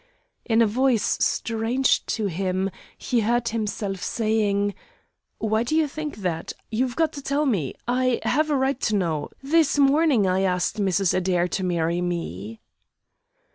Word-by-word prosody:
In 230 0 +4
a - - +4
voice 240 +1 +1
strange 230 +3 +1
to 220 - -1
him, 190 +1 -1 0.3
he 245 - 0
heard 235 +2 +1
himself 205 -3 -3
saying: 205 -3 0 0.6
"Why 220 0 0
do 240 +6 -1
you 320 -1 +3
think 300 +1 -5
that? 165 -2 -2 0.2
You've 245 +2 -1
got 320 0 +1
to 280 - -7
tell 280 +2 0
me. 190 - 0
I 255 0 +1
have 310 +4 +1
a 290 - +2
right 265 0 0
to 215 - +1
know. 165 -6 -1
This 300 0 +3
morning 280 -5 +4
I 185 0 +1
asked 185 +2 0
Mrs. 195 -1 +2
Adair 180 -1 +1
to 190 - -2
marry 170 -1 0
me." 115 - -4
220 Hz, 155 wpm, -24 LUFS, 185-260 Hz, 0.6 s, In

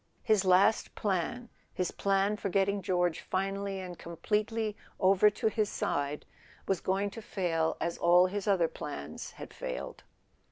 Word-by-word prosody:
His 215 -3 +3
last 190 +4 +4
plan, 205 +5 -1 0.2
his 180 -1 -2
plan 195 +1 +1
for 205 - -3
getting 195 +1 +1
George 180 -2 +1
finally 195 +1 -2
and 180 -2 -7
com¬ 170 0 -8
pletely 215 +2 0 0.3
over 195 +2 +5
to 210 - -6
his 215 -1 +1
side, 145 +1 -2 0.4
was 190 -3 0
going 195 +2 0
to 225 - -8
fail 165 -6 -1
as 170 0 -2
all 175 +1 +6
his 200 +2 -3
other 185 -5 +3
plans 145 - -7
had - - -10
failed. 65 - -6
195 Hz, 155 wpm, -31 LUFS, 175-205 Hz, 0.4 s, all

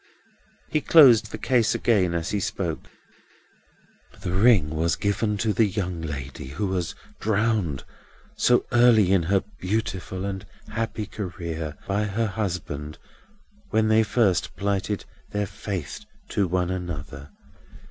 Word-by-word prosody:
He 155 - +1
closed 120 -11 +7
the - - -6
case 120 -4 +2
again 95 -7 +2
as 85 -1 -2
he 105 - 0
spoke. 90 -4 -3 1.3
"This - - -15
ring 95 -6 +4
was 80 +2 +1
given 105 +1 0
to 110 +1 0
the 105 +3 +3
young 90 -3 -3
lady 70 -4 -6
who 75 +10 -3
was 90 -3 -2 0.2
drowned 105 - 0 0.5
so 120 0 +3
early 120 -6 +5
in 95 - +4
her 95 +4 +1 0.2
beautiful 95 -1 -2
and 95 -1 -4 0.3
happy 115 -2 -3
career, 85 -6 -5
by 100 +2 0
her 105 +3 -1
husband, 90 -8 -4 0.7
when 110 0 +2
they 110 0 +5
first 105 -4 +1
plighted 100 0 -1 0.3
their 105 0 0
faith 95 - -5 0.3
to 100 -3 +1
one 90 0 0
another. 75 -6 -6
100 Hz, 130 wpm, -25 LUFS, 85-110 Hz, 1.3 s, closed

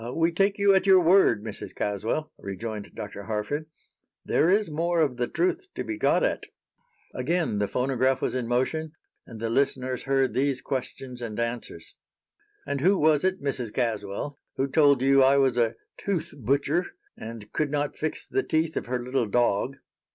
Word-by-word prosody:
"We 165 +1 +2
take 195 +4 +1
you 200 -1 +5
at 190 0 +2
your 190 -1 +8
word, 170 - +4
Mrs. 110 -2 -7
Caswell," 110 +10 -2
rejoined 105 +2 -6
Dr. 100 -1 -6
Harford. 115 +9 -3 0.6
"There 165 - +3
is 205 +3 +3
more 165 +2 0
of 140 -6 +1
the 120 -1 0
truth 185 - -1
to - - -3
be 330 - -4
got 320 - +2
at." - - -1 0.7
Again 155 -4 0
the 105 - +1
phonograph 130 +1 +1
was - - -1
in 125 -2 -2
motion, 150 +6 -1 0.3
and 110 - -10
the 115 0 -2
listeners 130 -1 0
heard 135 -1 +2
these 135 0 +1
questions 130 -1 -5
and 115 -2 -5
answers: 115 +1 -4 0.7
"And 140 - -2
who 190 +5 +4
was 155 -2 +3
it, 185 -4 0
Mrs. 130 -5 -2
Caswell, 115 +3 -2 0.2
who 135 - 0
told 140 -3 +4
you 135 0 +5
I 135 +1 +5
was 135 -3 +3
a 115 -1 +1 0.2
'tooth 170 -4 -2
butcher' 140 - 0 0.2
and 110 -2 -9
could 155 -2 0
not 145 0 -1
fix 155 0 -4
the 400 - 0
teeth 160 - 0
of - - -3
her 125 +1 -1
little 125 -2 0
dog?" 120 +3 +1
135 Hz, 175 wpm, -26 LUFS, 120-160 Hz, 0.7 s, your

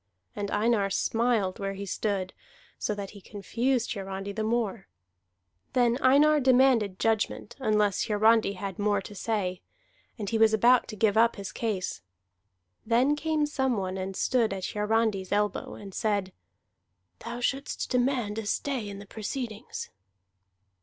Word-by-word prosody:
And 205 -1 -3
Einar 210 -2 +2
smiled 225 -2 +1
where 195 -1 -3
he 200 +1 -5
stood, 195 -1 -2 0.5
so 210 - -1
that 200 -1 -6
he 205 - -13
confused 235 +6 -1
Hiarandi 195 -1 -5
the 220 - -4
more. 220 -3 -1 0.9
Then 245 0 +3
Einar 295 +4 +5
demanded 250 -7 +4
judgment 225 0 -1
unless 210 -5 +1
Hiarandi 220 -1 +4
had 195 0 -6
more 205 0 +2
to 205 - -9
say. 190 -3 -2 0.6
And 210 -3 -4
he 225 +2 0
was 220 0 +5
about 240 +3 +4
to 215 - -7
give 215 0 +2
up 230 +1 +4
his 195 -2 -6
case. 205 - -3 0.8
Then 245 +6 +3
came 305 0 0
some 265 -5 0
one 185 -1 -2
and 190 0 -4
stood 235 -3 +1
at 190 -1 -4
Hiarandi's 210 -2 0
elbow, 210 0 0
and 200 -2 -10
said: 200 -3 -1 0.9
"Thou 235 +1 -6
shouldst 270 +3 -2
demand 245 -4 +1
a 215 - -5
stay 250 -3 -2
in 200 - -7
the 200 - -10
proceedings." 220 +2 -5
215 Hz, 145 wpm, -28 LUFS, 200-240 Hz, 0.9 s, Einar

